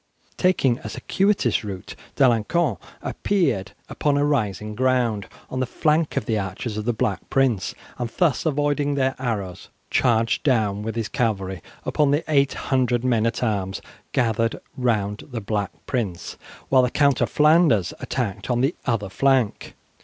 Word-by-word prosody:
Taking 140 -10 +2
a - - -7
circuitous 195 - +1
route, 95 -3 -7 0.2
D'Alencon 125 - +2 0.3
appeared 135 - 0
upon 145 -1 0
a 145 - +2
rising 105 -7 -1
ground 120 -4 +1 0.2
on 130 - -2
the 130 - 0
flank 155 +3 +1
of - - 0
the 110 -1 0
archers 100 +3 -4
of 105 0 -4
the 120 - +2
Black 105 -5 -2
Prince, 125 -8 +1 0.2
and 120 -1 -2
thus, 145 -11 +2
avoiding 145 -1 +1
their 135 -1 +1
arrows, 100 -8 -4 0.2
charged 115 -2 +2
down 110 -7 +1
with 110 +1 -4
his 115 -2 -1
cavalry 95 - -1 0.2
upon 150 -2 +2
the 145 +3 +2
800 130 -4 +1
men 115 -3 +2
at 115 - -2
arms 100 -4 -1 0.3
gathered 115 -1 +1 0.2
round 110 -5 -1
the 120 -3 -4
Black 105 -1 -2 0.2
Prince, 105 -9 -3 0.3
while 130 -1 +6
the 125 - +2
Count 140 +1 +2
of - - +2
Flanders 150 - +4
attacked 110 -5 -3
on 120 -1 +1
the 135 +6 +2
other 115 -5 0
flank. 130 +2 +1
120 Hz, 155 wpm, -23 LUFS, 105-140 Hz, 0.3 s, while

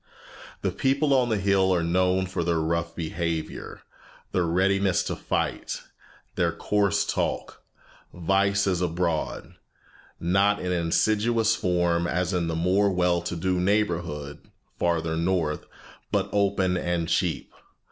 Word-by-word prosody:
The - - +1
people 140 +2 +1
on 125 -2 +3
the 110 - +1
hill 95 -1 +2
are 90 -2 +2
known 90 +2 +2
for 95 -2 -3
their 85 -1 +1
rough 85 +1 -1
behavior, 85 -1 -4 0.5
their 90 -2 +1
readiness 95 +2 +2
to - - -3
fight, - - -2 0.5
their - - +1
coarse 100 -2 +1
talk. - - -2 0.5
Vice 100 +3 +1
is 90 -3 0
abroad, 85 -2 -2 0.7
not 100 +4 +2
in 90 - -2
insidious 110 +6 +2
form 85 -3 +1
as 90 +2 -1
in 85 -2 0
the 80 - -2
more 95 +5 +2
well 90 -2 +1
to 90 0 -4
do 90 +2 0
neighborhood 85 -7 -1 0.4
farther 80 -2 0
north, 85 -2 -1 0.4
but - - 0
open 100 -2 +2
and 85 -2 -1
cheap. - - -1
90 Hz, 130 wpm, -26 LUFS, 85-100 Hz, 0.7 s, on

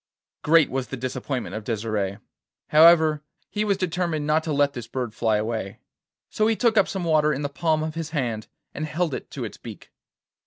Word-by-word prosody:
Great 160 -1 +4
was 130 -1 -2
the 135 - -6
disappointment 130 +1 -4
of 110 - -5
Desire. 105 -2 -2 0.5
However, 155 -1 +6 0.3
he 210 - -1
was 200 -2 +1
determined 175 -4 -1
not 155 +1 +2
to 160 - -2
let 145 -1 +2
this 120 -3 -7
bird 120 -2 -4
fly 110 -1 +1
away; 110 -2 -3 0.5
so 215 - +1
he 225 - +2
took 230 0 +2
up 200 - +4
some 190 -2 -4
water 155 -2 +3
in 145 0 -2
the 145 - -1
palm 155 +1 0
of 155 0 -3
his 165 -1 -4
hand 120 -8 -2 0.3
and 155 +2 -4
held 160 0 -1
it - - -6
to - - -5
its - - -8
beak. - - -11
150 Hz, 200 wpm, -24 LUFS, 120-165 Hz, 0.5 s, However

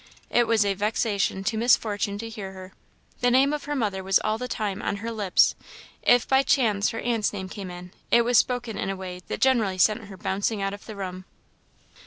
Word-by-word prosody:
It 240 -1 +3
was 225 -2 +3
a 200 - +1
vexation 205 -1 -1
to 220 +3 -1
Miss 240 +3 +5
Fortune 205 -2 -3
to 225 +2 -6
hear 205 -4 -7
her. 185 0 -11 0.5
The 245 - +3
name 270 +4 +4
of 300 - -4
her 295 0 -2
mother 205 -7 -1
was 190 0 +4
all 215 +1 -1
the 250 - -4
time 210 -5 -3
on - - -1
her 225 +3 -5
lips; 205 -5 +3 0.5
if 245 -1 +4
by 265 0 +4
chance 215 -7 +2
her 225 - -5
aunt's 230 -3 0
name 190 -2 -5
came 195 -1 -7
in, 180 0 -9 0.2
it 235 - +5
was 240 -1 +4
spoken 245 -3 -1
in - - -2
a 195 - -2
way 180 -1 -7
that - - -5
generally 225 -8 +2
sent 215 +4 +2
her 195 -1 -11
bouncing 200 +4 -1
out 195 0 -2
of 205 - -10
the 215 - -7
room. 185 -1 -6
210 Hz, 225 wpm, -25 LUFS, 195-235 Hz, 0.5 s, Miss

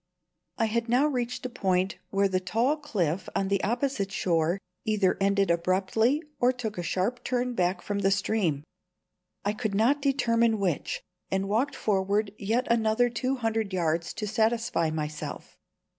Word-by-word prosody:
I 225 - +2
had 230 +1 -1
now 250 +5 +4
reached 250 -4 -2
a - - -1
point 190 -5 0
where 200 0 +2
the 185 -1 0
tall 225 +10 +1
cliff 190 - -2
on 195 - 0
the 200 -1 +1
opposite 240 -3 -1
shore 170 -2 +1 0.3
either 210 -4 +2
ended 195 -1 +3
abruptly 190 - +1 0.2
or 245 +1 +4
took 225 -6 -5
a - - 0
sharp 190 +8 -1
turn 250 0 -1
back 180 -3 0
from 205 -1 -2
the 195 -1 +3
stream. 195 -7 0 0.8
I 205 - +1
could 215 -2 -2
not 250 +8 +3
determine 235 -5 +2
which, 185 -7 -1 0.3
and 190 0 0
walked 235 +8 0
forward 200 0 0
yet 225 +5 0
another 235 +1 +3
two 255 +3 -1
hundred 225 -4 -1
yards 165 -2 0
to 215 - -3
satisfy 220 -6 +1
myself. 155 -1 -5
210 Hz, 160 wpm, -28 LUFS, 190-235 Hz, 0.8 s, now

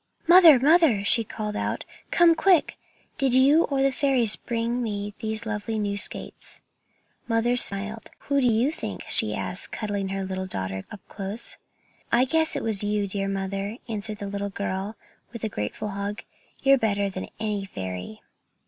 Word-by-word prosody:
"Mother, 340 -6 +8
mother!" 290 - +4
she 230 - +5
called 210 -1 -6
out, - - -3 0.2
"come 340 -1 +5
quick! 355 -1 +2 0.4
Did 265 -2 +2
you 280 +5 +5
or 275 -1 -1
the 275 - +2
fairies 255 -5 +3
bring 235 +1 -3
me 205 -2 -4
these 220 0 -2
lovely 220 +1 -4
new 205 -1 -2
skates?" 205 - -2 0.7
Mother 230 +1 +1
smiled. 210 -1 +3
"Who 280 -1 0
do 250 - +2
you 235 +5 +2
think?" 315 - -7
she - - +5
asked, - - -4
cuddling 205 -3 -3
her 195 0 -3
little 190 0 -5
daughter 95 - -4
up 210 - -11
close. 200 +3 -1 0.5
"I 245 +2 +4
guess 320 +4 +2
it - - -3
was 215 -3 0
you, 205 0 -1
dear 195 0 -3
mother," 195 +2 -4
answered 215 -1 -3
the 205 - -6
little 200 0 -4
girl, 195 +1 -4 0.4
with 235 -2 -9
a 220 - -1
grateful 155 - -5
hug; 200 +1 -5 0.4
"you're 275 -1 +5
better 205 -3 0
than 185 0 -7
any 210 -2 -3
fairy." 95 - -7
215 Hz, 165 wpm, -24 LUFS, 200-245 Hz, 0.7 s, Mother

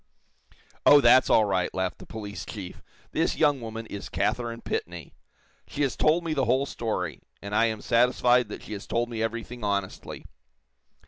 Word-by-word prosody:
"Oh, 145 - +8
that's 130 0 +6
all 110 - +5
right," 95 -3 0
laughed 95 -1 -2
the - - -12
police 105 -2 -7
chief. 95 -5 -8 0.3
"This - - 0
young 145 -4 +3
woman 115 0 -6
is 100 -2 -7
Katharine 115 +5 -2
Pitney. 85 -1 -4 0.6
She 145 - -2
has 135 - 0
told 160 +3 +2
me 165 -2 -2
the 135 -3 +1
whole 130 +4 +2
story, 105 - -3 0.2
and 100 +1 -7
I 115 +2 +4
am 110 -2 -2
satisfied 125 0 +3
that - - -8
she 105 - -7
has 100 - -7
told 120 +1 -1
me 115 -2 -4
everything 115 +1 -4
honestly. 100 -2 -3
115 Hz, 175 wpm, -26 LUFS, 100-125 Hz, 0.6 s, Oh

